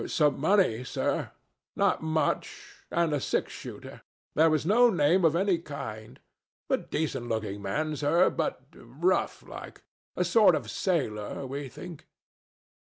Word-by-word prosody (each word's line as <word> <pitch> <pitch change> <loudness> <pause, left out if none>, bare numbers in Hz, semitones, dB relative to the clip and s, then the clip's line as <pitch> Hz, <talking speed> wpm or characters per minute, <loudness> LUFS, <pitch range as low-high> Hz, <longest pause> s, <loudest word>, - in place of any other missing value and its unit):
"Some 150 -3 +2
money, 155 - +3
sir—not - - -2
much, 160 0 -2
and 170 -2 +1
a 145 - +1
six - - -1
shooter. - - -9 0.3
There 160 +1 +5
was 155 -1 +1
no 240 +6 +5
name 175 -1 +3
of 165 -1 +4
any 185 -1 +2
kind. 110 -9 -8 0.5
A - - +4
decent 135 -6 -3
looking 105 -3 -3
man, 150 +11 -2
sir, 160 +6 +3
but - - -2
rough 155 +11 -1
like. - - -10 0.3
A 180 - +1
sort 190 -1 +5
of 120 -8 -4
sailor 135 - -2
we 135 +1 -5
think." 170 +3 -10
155 Hz, 135 wpm, -28 LUFS, 130-175 Hz, 0.5 s, There